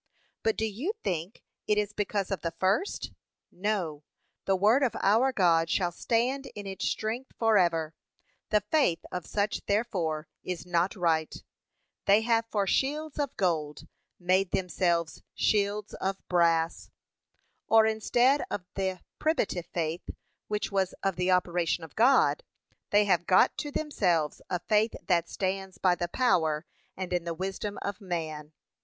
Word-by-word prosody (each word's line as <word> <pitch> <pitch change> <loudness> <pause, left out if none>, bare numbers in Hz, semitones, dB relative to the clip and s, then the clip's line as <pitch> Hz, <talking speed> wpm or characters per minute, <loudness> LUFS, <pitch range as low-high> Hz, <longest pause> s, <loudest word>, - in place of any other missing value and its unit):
But 220 - +1
do 220 - 0
you 240 - -2
think 175 +4 -3 0.2
it 210 - +2
is 210 0 0
because 205 -1 -2
of 195 - -2
the 165 0 -3
first? 200 - 0 0.4
no, 180 -6 -2 0.4
the 195 - +3
word 215 +8 +4
of 260 -4 +1
our 225 +7 +3
God 165 -7 +3
shall 175 -3 +1
stand 245 +9 0
in 205 -1 -7
its 195 -1 -4
strength 230 +4 -3
for 225 -1 +3
ever; 165 -4 +2 0.6
the 210 -1 +3
faith 205 - +1
of 180 -2 -5
such 205 +1 -1
therefore 175 -8 -1 0.2
is 180 -1 -4
not 175 +2 +1
right; 165 -4 0 0.6
they 200 +2 +5
have 230 0 +1
for 205 -3 0
shields 300 +8 -1
of 280 -2 -2
gold, 155 -5 -1 0.3
made 185 +1 +2
themselves 175 -3 0
shields 205 0 +1
of 195 +1 -4
brass; 165 -2 +2 0.8
or 220 0 +6
instead 240 +5 +3
of 185 - -4
the 190 -2 -2 0.2
primitive 210 - 0
faith, 165 0 -3 0.4
which 210 0 -2
was 190 -2 0
of 195 -2 +1
the 180 +1 0
operation 175 -2 +1
of 160 - -11
God, 265 - +4 0.5
they 205 0 +4
have 175 -3 +2
got 185 - +5
to 295 - -3
themselves 185 - 0
a 180 - 0
faith 215 +4 +1
that 170 -2 +1
stands 190 0 -3
by 185 -2 +3
the 175 0 -2
power, 165 -8 +1 0.3
and 185 -1 -4
in 175 -1 0
the 170 -1 -4
wisdom 195 +3 -4
of 200 +1 -4
man. 160 -5 -4
190 Hz, 150 wpm, -28 LUFS, 175-215 Hz, 0.8 s, or